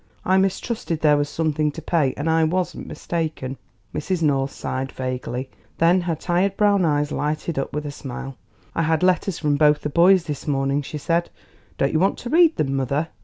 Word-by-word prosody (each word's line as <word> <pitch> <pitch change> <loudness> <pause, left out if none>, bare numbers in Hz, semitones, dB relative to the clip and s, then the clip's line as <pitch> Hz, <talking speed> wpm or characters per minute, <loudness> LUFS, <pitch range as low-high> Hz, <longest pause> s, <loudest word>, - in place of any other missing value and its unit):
I 190 +1 +3
mistrusted 190 -3 -1
there 150 -1 +5
was 145 0 0
something 155 -2 0
to - - -7
pay, 155 -6 +1
and 145 - -3
I 160 0 +3
wasn't 180 +3 -1
mistaken." 155 -6 -3 0.4
Mrs. 175 +2 -2
North 135 -2 +2
sighed 135 0 -4
vaguely. 130 0 -4 0.3
Then 175 +3 +4
her 175 -2 -1
tired 185 +4 0
brown 200 -3 +3
eyes 145 -1 +1
lighted 150 +1 -2
up 135 - -3
with 150 +1 -4
a 145 - -4
smile. 135 -1 -7 0.4
"I - - 0
had 160 +1 +1
letters 185 0 +2
from 145 -2 +1
both 150 0 +4
the 150 - -2
boys 175 +4 +5
this 150 -4 -6
morning," 140 0 +1
she 150 +2 -6
said; 170 +3 0 0.5
"don't 135 - +1
you 155 - +3
want 190 +3 +2
to 240 - -6
read 335 -1 +5
them, 135 -2 -1
mother? 140 +5 -1
155 Hz, 195 wpm, -22 LUFS, 145-175 Hz, 0.5 s, there